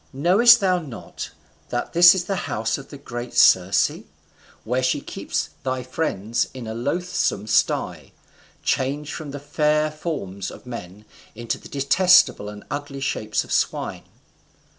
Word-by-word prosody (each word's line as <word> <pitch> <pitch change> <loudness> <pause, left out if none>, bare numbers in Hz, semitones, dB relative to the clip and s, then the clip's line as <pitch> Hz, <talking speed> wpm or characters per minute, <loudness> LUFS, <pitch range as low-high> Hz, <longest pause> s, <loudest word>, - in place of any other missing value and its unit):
knowest 200 - +6
thou 185 -2 +2
not 140 -9 -8 0.4
that - - -3
this 175 +2 +8
is 185 - -1
the 195 +2 -2
house 110 +4 -1
of 140 +1 -12
great 120 0 -6
Circe, 95 +1 +5 0.7
where 125 +3 -1
she 130 0 +1
keeps - - -4
thy 130 -1 -2
friends 120 -5 -1
in 125 -3 -7
a 110 - -5
loathsome 140 - -1
sty, 110 - 0 0.5
changed 145 +4 -1
from 155 -3 -6
the 145 +1 -6
fair 150 +1 +1
forms 100 - -5
of - - -12
men 105 -4 -9 0.3
into 120 +1 -4
the - - -13
detestable 140 - +4
and 105 0 -10
ugly 145 -1 -5
shapes 110 -5 -1
of - - -13
swine? - - -1
135 Hz, 140 wpm, -23 LUFS, 115-155 Hz, 0.7 s, this